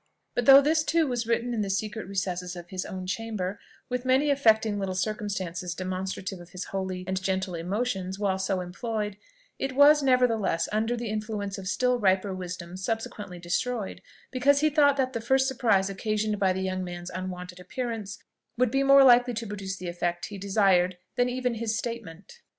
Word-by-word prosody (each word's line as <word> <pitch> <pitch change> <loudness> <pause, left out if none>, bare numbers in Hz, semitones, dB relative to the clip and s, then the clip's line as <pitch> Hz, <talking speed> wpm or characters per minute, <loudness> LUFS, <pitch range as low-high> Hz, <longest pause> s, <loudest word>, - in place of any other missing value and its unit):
But 245 - -1
though 275 0 +10
this 310 +2 +2
too 325 +1 +2
was 240 -4 -2
written 235 +1 0
in 225 - -1
the 200 - -2
secret 210 +1 -3
recesses 180 -2 -3
of 175 0 -9
his 185 -1 -4
own 185 -2 -6
chamber, 205 -1 -3 0.3
with 250 0 -2
many 265 +3 +3
affecting 220 -6 +3
little 190 -1 -2
circumstances 185 -3 -3
demonstrative 185 0 -4
of 175 0 -12
his 185 - -4
holy 190 -1 -3
and 190 +1 -2
gentle 190 0 -1
emotions 190 +2 -2
while 195 -2 0
so 190 -1 0
employed, 210 +2 -4 0.4
it 270 -1 -2
was, 290 +2 +7
nevertheless, 230 -10 +2
under 225 +3 0
the 235 -1 -4
influence 210 -2 -3
of 190 - -7
still 250 +4 +1
riper 190 -1 +2
wisdom, 180 -1 -6
subsequently 205 -2 -4
destroyed, 195 +5 -2 0.3
because 280 +2 +3
he 310 0 +3
thought 285 -1 +4
that 260 -1 0
the 230 - -3
first 265 +3 +2
surprise 235 -8 +2
occasioned 210 +1 -1
by 190 -1 +3
the 185 +1 -2
young 185 0 -2
man's 175 0 -6
unwonted 180 -1 -6
appearance 225 +1 -5 0.4
would 250 -1 +2
be 270 +1 +2
more 275 0 +7
likely 245 -1 +6
to 230 +1 -3
produce 195 -2 -5
the 185 - -6
effect 175 0 -2
he 200 -2 -7
desired 190 -2 +2 0.2
than 245 0 +2
even 250 -1 -1
his 225 -1 -2
statement. 230 - -7
205 Hz, 185 wpm, -27 LUFS, 185-245 Hz, 0.4 s, though